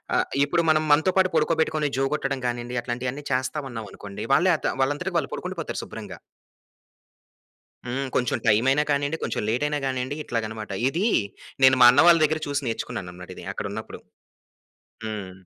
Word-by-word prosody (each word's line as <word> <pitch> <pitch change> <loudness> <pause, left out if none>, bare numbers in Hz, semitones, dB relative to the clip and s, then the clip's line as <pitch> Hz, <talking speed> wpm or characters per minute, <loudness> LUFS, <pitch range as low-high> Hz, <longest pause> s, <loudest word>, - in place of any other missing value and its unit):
ఆహ్, - - +2 0.2
ఇప్పుడు 170 +4 +1
మనం 155 0 +2
మనతో 160 +5 +3
పాటు 185 -1 +4
పడుకోబెట్టుకొని, 155 -1 +1
జో 135 - +2
కొట్టడం 135 -3 -2
గానీండి 120 +1 -3
అట్లాంటియన్నీ 125 +4 -4
చేస్తామన్నాం 130 -3 -2
అనుకోండి. 100 -1 -8
వాళ్ళే 180 +6 +4
అత - - -2
వాళ్ళంతటికి 160 +7 0
వాళ్ళు - - -5
పడుకుండిపోతారు - - -5
శుభ్రంగా. - - -9 1.7
హ్మ్. 135 +3 -2
కొంచెం 125 -1 +1
టైమైన 125 +6 +4
కానీండి, 145 +2 0
కొంచెం - - -2
లేటైన 150 +6 0
గానీండి, 130 +1 -2
ఇట్లాగనమాట. 110 -2 -4 0.2
ఇదీ 175 +10 0 0.5
నేను 130 -1 +7
మా 120 - +10
అన్న 125 - +5
వాళ్ళ 170 -1 +8
దగ్గర 155 +1 +1
చూసి 145 0 -2
నేర్చుకున్నాననమాట 90 -6 -5 0.2
అక్కడున్నప్పుడు. 110 +2 -6 1.1
హ్మ్. 105 -4 -5
135 Hz, 140 wpm, -25 LUFS, 120-150 Hz, 1.7 s, మా